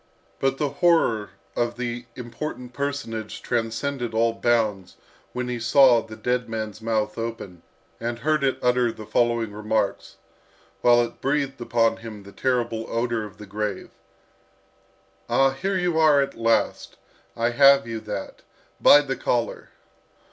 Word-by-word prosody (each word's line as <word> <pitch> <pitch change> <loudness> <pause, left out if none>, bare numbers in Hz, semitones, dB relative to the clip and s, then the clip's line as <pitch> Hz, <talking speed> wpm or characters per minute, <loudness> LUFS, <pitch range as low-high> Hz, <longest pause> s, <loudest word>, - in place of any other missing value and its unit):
But 135 0 +1
the 145 -1 0
horror 160 -12 +3 0.3
of 120 0 -1
the 120 -1 -4
important 125 0 -6
personage 130 -6 -4
transcended 120 +1 -2
all 115 0 +2
bounds 110 -6 0 0.3
when 125 0 -3
he 125 -1 -3
saw 120 0 +5
the 110 0 -10
dead 125 +1 -1
man's 110 -1 -5
mouth 110 -1 -1
open, 115 -6 -6 0.4
and 120 0 -3
heard 150 +4 0
it 135 -1 +1
utter 125 -1 +3
the 110 - -10
following 115 0 +1
remarks, 105 -1 -2 0.7
while 120 0 +5
it 120 - -7
breathed 140 -2 -1
upon 115 -1 +2
him 110 -3 -9
the 100 - -12
terrible 120 -2 -1
odour 115 -1 -1
of 105 -1 -12
the 105 - -10
grave: 105 0 -4 1.4
"Ah, 135 +3 +4
here 190 +8 -2
you 175 -3 0
are 155 -3 +5
at 140 - 0
last! 115 0 0 0.4
I 115 +1 +1
have 140 +2 +6
you, 115 -1 -4
that 105 -2 -6 0.4
by 145 - +8
the 135 -2 -3
collar! 120 -2 -2
120 Hz, 145 wpm, -24 LUFS, 110-135 Hz, 1.4 s, by